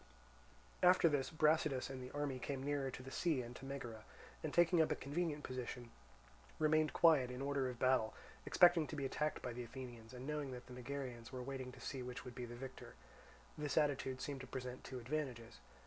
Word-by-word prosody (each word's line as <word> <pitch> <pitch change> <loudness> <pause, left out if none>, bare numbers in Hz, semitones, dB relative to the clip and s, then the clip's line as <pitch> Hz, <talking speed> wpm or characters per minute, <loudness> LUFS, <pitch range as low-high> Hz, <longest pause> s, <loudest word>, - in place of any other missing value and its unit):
After 180 -1 +7
this 145 -4 +1
Brasidas 155 -4 +3
and 135 -1 -6
the 125 - -6
army 145 -2 -2
came 135 0 -3
nearer 140 -1 0
to 130 0 -7
the 135 - -8
sea 155 -6 +1
and 120 +1 -8
to 135 - -9
Megara, 120 -5 -5 0.4
and - - -2
taking 175 0 +5
up 160 - +3
a - - +3
convenient 150 +1 -2
position, 125 -2 -5 0.7
remained 155 0 +3
quiet 155 -7 +6
in 125 0 -5
order 140 -1 0
of 125 - -6
battle, 130 -3 +3 0.3
expecting 175 -3 +6
to - - -5
be 140 -2 -2
attacked 150 +3 -1
by - - -3
the 125 +1 -4
Athenians 120 -1 -8
and 125 +1 -7
knowing 150 -2 -2
that 125 0 -8
the 125 - -10
Megarians 125 -2 -5
were 130 -1 -4
waiting 130 -1 -4
to - - -12
see 135 -2 -4
which 125 +2 -6
would 125 - -7
be 125 0 -5
the 120 0 -8
victor. 130 +2 -8 0.6
This 145 -3 -1
attitude 135 -3 +2
seemed 140 -2 -3
to 130 - -8
present 125 0 -5
two 130 - -6
advantages. 125 -3 -3
135 Hz, 205 wpm, -39 LUFS, 125-150 Hz, 0.7 s, After